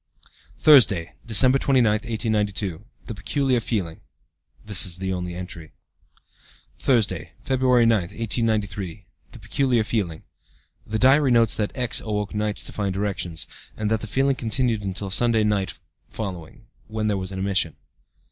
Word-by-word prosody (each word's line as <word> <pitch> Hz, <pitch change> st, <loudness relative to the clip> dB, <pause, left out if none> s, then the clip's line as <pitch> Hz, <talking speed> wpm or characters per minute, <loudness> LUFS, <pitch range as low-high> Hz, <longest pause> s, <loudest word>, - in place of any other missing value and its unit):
"Thursday, 115 Hz, -, +5 dB
December 130 Hz, +5 st, +6 dB
29, 130 Hz, -4 st, +3 dB
1892. 105 Hz, -4 st, -2 dB, 0.2 s
The 115 Hz, -, -6 dB
peculiar 130 Hz, +5 st, 0 dB
feeling. 95 Hz, -8 st, -3 dB, 0.6 s
(This 100 Hz, -5 st, +6 dB
is 90 Hz, -2 st, +1 dB
the 95 Hz, 0 st, -3 dB
only 90 Hz, -1 st, -4 dB
entry.) 90 Hz, -3 st, -8 dB, 1.1 s
"Thursday, 95 Hz, -, 0 dB
February 130 Hz, -3 st, +3 dB
9, 115 Hz, -2 st, +4 dB
1893. 105 Hz, -1 st, -2 dB, 0.3 s
The -, -, -11 dB
peculiar 130 Hz, -5 st, 0 dB
feeling. 100 Hz, -8 st, -3 dB, 0.6 s
(The 110 Hz, -, -2 dB
diary 135 Hz, +4 st, +4 dB
notes 115 Hz, -2 st, +4 dB
that 105 Hz, -1 st, -1 dB
X. 125 Hz, -3 st, 0 dB
awoke 105 Hz, -2 st, -3 dB
nights 105 Hz, 0 st, -2 dB
to -, -, -7 dB
find 100 Hz, -2 st, -3 dB
erections, 95 Hz, -5 st, -2 dB, 0.3 s
and 105 Hz, 0 st, -2 dB
that 110 Hz, -1 st, +1 dB
the 110 Hz, -, -5 dB
feeling 135 Hz, +5 st, +1 dB
continued 115 Hz, -2 st, 0 dB
until 95 Hz, 0 st, -4 dB
Sunday 115 Hz, +1 st, +2 dB
night 105 Hz, -3 st, -1 dB, 0.3 s
following, 100 Hz, -, -7 dB, 0.2 s
when 110 Hz, 0 st, -3 dB
there 105 Hz, -1 st, +1 dB
was 95 Hz, 0 st, -3 dB
an 95 Hz, -, -6 dB
emission.) 95 Hz, -4 st, 0 dB
105 Hz, 140 wpm, -23 LUFS, 95-115 Hz, 1.1 s, December